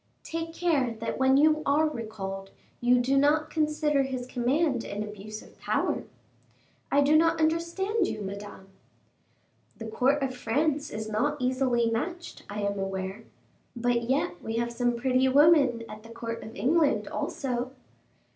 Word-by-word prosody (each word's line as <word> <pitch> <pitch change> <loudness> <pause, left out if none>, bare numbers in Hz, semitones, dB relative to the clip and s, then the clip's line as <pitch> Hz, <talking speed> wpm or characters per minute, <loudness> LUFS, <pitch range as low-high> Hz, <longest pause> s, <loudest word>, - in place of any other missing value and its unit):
"Take 330 0 -4
care 280 -9 +1
that 230 +3 -4
when 265 0 +5
you 310 +1 +4
are 305 +2 +3
recalled, 200 -7 -5 0.3
you 245 +1 +4
do 250 +3 +2
not 305 +2 +2
consider 300 -2 +1
his 260 -2 -3
command 255 +2 0
an 205 +1 -4
abuse 215 +1 -8
of - - -19
power." - - -1 0.9
"I 285 - +4
do 290 +2 +4
not 330 +1 +4
understand 340 +6 +1
you, 210 - -4
Madame." 200 0 -8 1.1
"The 225 - -7
court 265 +6 +1
of 260 -1 -2
France 290 +5 0
is 220 0 -5
not 220 +8 0
easily 255 -2 +1
matched, 340 +10 -4
I 205 +1 -4
am 200 0 -1
aware, 195 +2 -4 0.5
but 240 0 +1
yet 265 - 0
we 225 - -3
have 235 +1 -1
some 240 0 +1
pretty 255 +2 +2
women 280 -4 +5
at 215 0 -9
the 230 - -14
court 230 0 -5
of 220 - -10
England 290 - +2
also." 250 -2 -3
255 Hz, 155 wpm, -28 LUFS, 225-300 Hz, 1.1 s, when